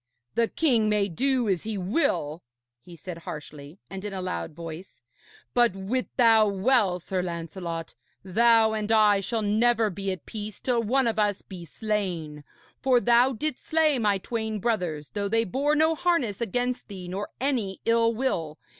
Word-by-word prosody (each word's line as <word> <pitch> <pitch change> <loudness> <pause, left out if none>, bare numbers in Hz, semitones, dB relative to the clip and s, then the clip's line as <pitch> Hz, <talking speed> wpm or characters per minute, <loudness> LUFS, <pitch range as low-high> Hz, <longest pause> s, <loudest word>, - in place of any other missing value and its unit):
'The 230 0 +2
king 235 -9 +2
may 210 -1 +2
do 250 +5 0
as 190 -4 +1
he 220 -1 -4
will,' 180 - 0 0.4
he 170 +7 -13
said 175 0 -8
harshly 150 0 -9
and 195 0 -8
in 210 - -4
a 190 - -3
loud 85 - -3
voice, 165 +2 -9 0.5
'but 240 -5 +3
wit 210 +7 -2
thou 225 -3 +6
well, 200 -2 +2
Sir 185 +2 -2
Lancelot, 170 -1 -5 0.3
thou 220 +3 +4
and 215 0 -2
I 210 -2 +5
shall 220 +3 -2
never 220 +1 +2
be 195 +2 -3
at 185 - -7
peace 210 -1 -7
till 245 -2 +1
one 255 +4 +2
of 225 -2 0
us 205 -2 +1
be 180 -3 -9
slain; 175 -6 -3 0.4
for 260 -2 +4
thou 240 +2 +4
didst 270 +4 -3
slay 310 -4 +2
my 205 -3 +2
twain 220 +2 -3
brothers, 180 -9 -2
though 205 -1 -2
they 225 +2 +2
bore 280 +8 0
no 315 +1 +3
harness 310 - 0
against 245 +2 -2
thee 185 -3 -8
nor 195 +3 -4
any 240 -8 -1
ill 230 0 +3
will. 180 - -2
210 Hz, 170 wpm, -26 LUFS, 185-240 Hz, 0.5 s, thou